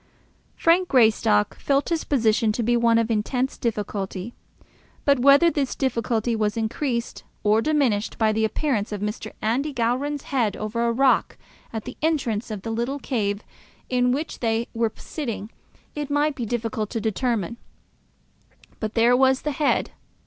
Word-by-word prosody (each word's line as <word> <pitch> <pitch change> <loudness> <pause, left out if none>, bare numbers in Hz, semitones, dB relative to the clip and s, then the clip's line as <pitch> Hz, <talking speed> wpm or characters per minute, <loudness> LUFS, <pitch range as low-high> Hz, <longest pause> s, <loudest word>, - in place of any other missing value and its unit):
Frank 350 +2 +3
Greystock 220 - +3
felt 280 0 +1
his 335 -2 -1
position 225 -4 +2
to 235 - -1
be 240 +2 +2
one 235 -1 +4
of 230 0 +1
intense 250 +5 0
difficulty, 205 -2 -3 0.7
but 280 -2 +4
whether 280 +6 +6
his 275 -3 -1
difficulty 235 -3 0
was 215 0 0
increased 235 +2 -2 0.2
or 215 +2 +4
diminished 260 -8 +1
by 220 -1 +3
the 220 +1 0
appearance 220 -2 -1
of 210 - -3
Mr. 210 +1 -4
Andy 255 +8 0
Gowran's 265 +4 -1
head 235 -7 0
over 230 +2 -1
a - - +2
rock 260 +3 +2 0.3
at 220 -2 -5
the 255 - -8
entrance 265 -10 0
of 210 -3 -5
the 225 - -3
little 240 +5 -2
cave 210 -7 -2 0.5
in 250 -1 +2
which 295 +5 -3
they 230 0 0
were 230 -1 0
sitting, 230 -8 -5 0.4
it 295 -1 -4
might 290 +1 +2
be 240 -4 -4
difficult 225 -2 -2
to 230 - -3
determine. 225 -1 -1 1.2
But 215 0 -4
there 235 +1 +5
was 265 +1 +3
the 300 - -1
head. 295 +1 +1
235 Hz, 155 wpm, -24 LUFS, 220-270 Hz, 1.2 s, whether